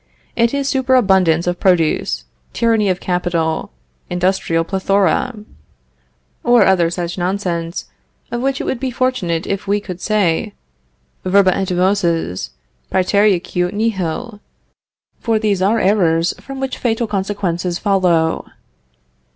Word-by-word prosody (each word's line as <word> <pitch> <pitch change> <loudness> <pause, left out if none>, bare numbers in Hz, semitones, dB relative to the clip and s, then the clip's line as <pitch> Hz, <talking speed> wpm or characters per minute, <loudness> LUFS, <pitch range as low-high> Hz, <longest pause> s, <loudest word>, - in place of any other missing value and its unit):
It 235 0 +2
is 280 -1 -1
superabundance 195 -12 +3
of 175 0 -1
produce, 160 - +1 0.3
tyranny 225 -3 +2
of 185 -1 0
capital, 170 -3 -1 0.4
industrial 180 -2 0
plethora, 195 +5 +1 1.1
or 240 0 +5
other 175 -3 +3
such 175 +1 -4
nonsense, 175 -2 -2 0.5
of 240 - -2
which, 275 +1 0
it - - -2
would 250 - -2
be 260 0 -2
fortunate 240 -10 -1
if 200 0 -3
we 205 +1 +2
could 185 -3 -8
say: 200 -7 0 0.7
Verba 185 0 +4
et 190 -1 -2
voces 175 - 0 0.4
prætereaque 185 -2 +2
nihil, 210 0 -2 0.8
for 225 -2 +1
these 210 -3 0
are 210 +4 +2
errors 175 -5 +2
from 270 -1 -8
which 265 -1 -3
fatal 235 -1 0
consequences 190 -4 -2
follow. 180 -5 +1
190 Hz, 120 wpm, -18 LUFS, 175-215 Hz, 1.1 s, or